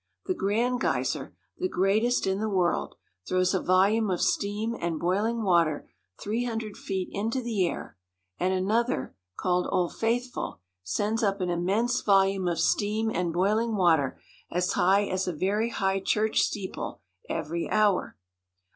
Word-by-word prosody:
The 370 - 0
Grand 240 - 0
Geyser, - - -1 0.2
the 370 - 0
greatest 215 - +2
in 190 +1 0
the 220 0 -1
world, 185 -4 0 0.3
throws 185 +1 +2
a 190 - +1
volume 200 +4 +3
of 180 - 0
steam 210 +3 0
and 170 -2 -2
boiling 210 +6 0
water 170 -6 +2 0.3
three 220 +4 -1
hundred 225 -3 -4
feet 190 -2 -3
into 225 +6 -1
the 220 -7 0
air; - - -6 0.4
and 185 - +1
another, 200 - 0 0.2
called 180 0 +1
Old 180 -2 0
Faithful, 240 - -2 0.2
sends 210 - -1
up 200 -2 +1
an 180 -1 -1
immense 205 +9 +1
volume 195 -2 +3
of 170 -2 0
steam 215 +5 +1
and 175 -2 -1
boil 195 +6 +2
ing 230 -1 -1
water 165 -8 +2 0.3
as 180 +1 0
high 195 +3 +4
as 185 -1 -2
a 180 - -1
very 205 +8 0
high 195 -3 0
church 215 +3 +1
steeple 195 -3 -3 0.3
every 165 +3 -3
hour. 210 -3 +2
195 Hz, 155 wpm, -27 LUFS, 180-220 Hz, 0.4 s, high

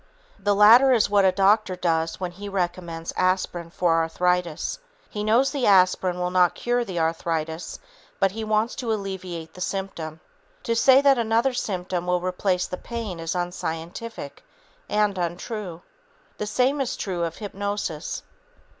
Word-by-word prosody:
The 205 0 +1
latter 230 +6 +7
is 220 -4 +2
what 200 -1 +4
a 190 - +5
doctor 195 +1 +3
does 165 -2 -1
when 180 -2 -3
he 200 +3 -8
recommends 175 -3 -3
aspirin 185 -2 0
for 170 -1 +1
arthritis. 175 - -1 0.3
He 210 - -3
knows 230 +6 +3
the 280 -4 0
aspirin 185 -2 +4
will 180 0 -1
not 180 -1 +3
cure 240 0 0
the 190 -6 -6
arthritis, 160 0 -2 0.4
but 195 -1 +3
he 220 +3 -5
wants 215 +2 +1
to 240 -4 -2
alleviate 185 -6 -5
the 180 - -11
symptom. 175 -5 -4 0.4
To 230 - 0
say 260 +3 +6
that 275 -3 +4
another 230 +3 +2
symptom 180 -6 -3
will 180 0 +2
replace 180 0 0
the 180 - -5
pain 225 -7 -5
is 165 +2 -3
unscientific 175 0 -5 0.5
and 210 -2 +1
untrue. 175 +1 -4 0.6
The 210 - -2
same 255 +6 +1
is 260 - -2
true 180 -4 -2
of 165 -1 -3
hypnosis. 200 -6 -4
185 Hz, 155 wpm, -24 LUFS, 175-215 Hz, 0.6 s, latter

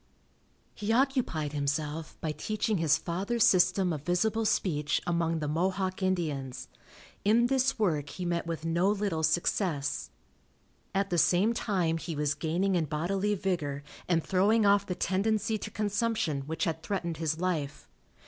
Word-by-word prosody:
He 210 +1 -3
occupied 240 - +1
himself 150 +2 -2
by 160 - -1
teaching 210 - -1
his 160 -1 +3
father's 195 +8 -1
system 185 -1 +4
of 150 - -4
visible 215 +8 0
speech 150 -8 +1
among 170 -1 0
the 150 -2 -3
Mohawk 185 +4 -1
Indians. 155 -9 -2 0.5
In 225 +4 +4
this 265 +1 +1
work 155 -10 0
he 180 +3 -6
met 170 -1 -1
with 165 -1 -4
no 170 +4 +2
little 205 -6 0
success. 160 -2 0 0.9
At 195 0 0
the 175 - +2
same 190 +8 +3
time 180 -8 0
he 165 -1 -5
was 145 0 0
gaining 170 +6 0
in 170 -3 +1
bodily 190 +8 -1
vigor 155 -7 -2 0.2
and 165 -3 +2
throwing 205 +4 +3
off 200 0 +4
the 180 - -2
tendency 215 +4 0
to 210 - -5
consumption 205 - -1
which 160 +1 -2
had 160 -1 -1
threatened 170 -2 -3
his 160 0 -1
life. 160 -6 -2
175 Hz, 150 wpm, -29 LUFS, 160-205 Hz, 0.9 s, system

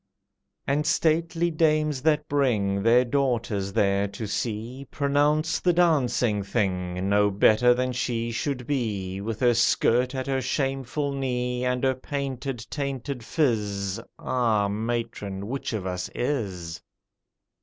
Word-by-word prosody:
And 145 +2 +1
stately 165 +1 +1
dames 155 -3 +1
that 150 0 +2
bring 105 -9 +1
Their 120 +4 +5
daughters 120 -7 0
there 100 0 +2
to 110 +3 -6
see, 115 +5 -4
Pronounce 150 +3 +1
the 180 - +2
"dancing 130 -11 +2
thing" 95 -3 -1
No 105 +1 +3
better 110 +5 +4
than 130 +1 0
she 120 -1 -2
should 125 +2 -3
be, 105 -8 -2
With 110 +1 -4
her 120 -1 +5
skirt 120 +2 +2
at 130 -1 -2
her 135 -1 0
shameful 135 +2 -1
knee, 125 -2 -2
And 125 0 0
her 130 0 +3
painted, 130 -2 -4
tainted 140 -2 -3
phiz: 105 - 0 0.2
Ah, 115 -5 +1
matron, 105 -3 -3
which 135 +5 -4
of 105 -5 -3
us 90 -1 -3
is? 95 - -3
125 Hz, 130 wpm, -26 LUFS, 105-140 Hz, 0.2 s, Their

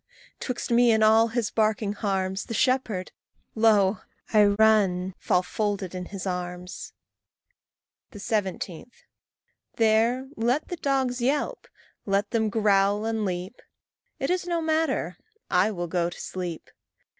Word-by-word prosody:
'twixt 250 -1 -4
me 240 0 +5
and 220 -1 +3
all 220 +1 +5
his 230 -1 -2
barking 215 -2 +1
harms, 195 -2 -2
The 230 - -5
shepherd, 230 -8 0 0.4
lo! 215 -3 +3 0.3
I 210 -1 +6
run 200 -3 +3
fall 180 - +1
folded 200 -2 -2
in 180 -1 -5
his 195 0 -7
arms. 180 -1 -5 1.2
17. 200 -3 -3 0.9
There 230 +4 +2
let 245 +6 0
the 355 - -4
dogs 265 -4 0
yelp, 275 +4 -1 0.4
let 200 +1 0
them 220 -2 +1
growl 205 -1 +2
and 225 -1 -1
leap; 185 +4 -5 0.6
It - - -1
is 360 -1 -1
no 340 -1 0
matter 320 0 -1 0.3
I - - +3
will 175 -5 -3
go 170 0 0
to 175 - -11
sleep. 175 -3 -6
215 Hz, 130 wpm, -26 LUFS, 190-235 Hz, 1.2 s, I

